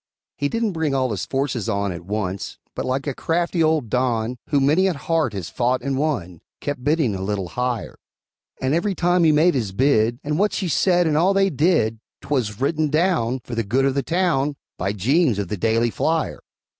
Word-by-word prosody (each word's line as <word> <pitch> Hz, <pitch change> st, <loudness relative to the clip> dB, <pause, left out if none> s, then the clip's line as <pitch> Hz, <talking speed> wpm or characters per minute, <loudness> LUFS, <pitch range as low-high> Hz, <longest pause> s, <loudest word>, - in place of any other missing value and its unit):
He 145 Hz, -, -1 dB
didn't 230 Hz, +2 st, 0 dB
bring 160 Hz, -5 st, -1 dB
all 130 Hz, -2 st, +1 dB
his 100 Hz, -3 st, -3 dB
forces 135 Hz, -5 st, -1 dB
on 100 Hz, -1 st, 0 dB
At 85 Hz, -1 st, -8 dB
once, 100 Hz, -2 st, -3 dB, 0.2 s
but -, -, -4 dB
like 130 Hz, +1 st, -1 dB
a 140 Hz, -, -2 dB
crafty 170 Hz, +4 st, -1 dB
old 155 Hz, -5 st, +2 dB
Don, 125 Hz, -1 st, 0 dB
Who 145 Hz, -, +3 dB
many 150 Hz, +8 st, +3 dB
a 185 Hz, -, 0 dB
heart 160 Hz, -5 st, 0 dB
had 95 Hz, -4 st, -4 dB
fought 125 Hz, +6 st, -1 dB
and 135 Hz, 0 st, -1 dB
won, 110 Hz, -, -2 dB, 0.2 s
Kept 145 Hz, -3 st, -4 dB
bidding 145 Hz, -6 st, +2 dB
a 95 Hz, -, -4 dB
little 95 Hz, -2 st, -2 dB
higher; 125 Hz, -3 st, -3 dB, 0.6 s
And 130 Hz, +2 st, 0 dB
every 185 Hz, +4 st, 0 dB
time 175 Hz, 0 st, +2 dB
he 160 Hz, -, +5 dB
made 160 Hz, +4 st, +4 dB
his 110 Hz, -7 st, -2 dB
bid, 120 Hz, -1 st, +2 dB
And 150 Hz, +2 st, -1 dB
what 205 Hz, +1 st, +2 dB
she 190 Hz, -4 st, -2 dB
said, 175 Hz, +2 st, +3 dB
and 155 Hz, -2 st, +1 dB
all 180 Hz, +5 st, +3 dB
they 195 Hz, 0 st, +3 dB
did 145 Hz, -8 st, +2 dB, 0.2 s
'Twas 120 Hz, -8 st, -2 dB
written 155 Hz, +3 st, +1 dB
down, 155 Hz, -6 st, +1 dB
For 125 Hz, -, -8 dB
the 115 Hz, -, 0 dB
good 130 Hz, +7 st, +1 dB
of 135 Hz, -, +2 dB
the 140 Hz, -, 0 dB
town, 150 Hz, -3 st, 0 dB, 0.2 s
By 95 Hz, +2 st, -2 dB
Jeems, 130 Hz, -, +2 dB
of 100 Hz, -3 st, -3 dB
The 105 Hz, -, -3 dB
Daily 115 Hz, +3 st, +1 dB
Flyer. 160 Hz, +5 st, -1 dB
135 Hz, 205 wpm, -22 LUFS, 115-160 Hz, 0.6 s, he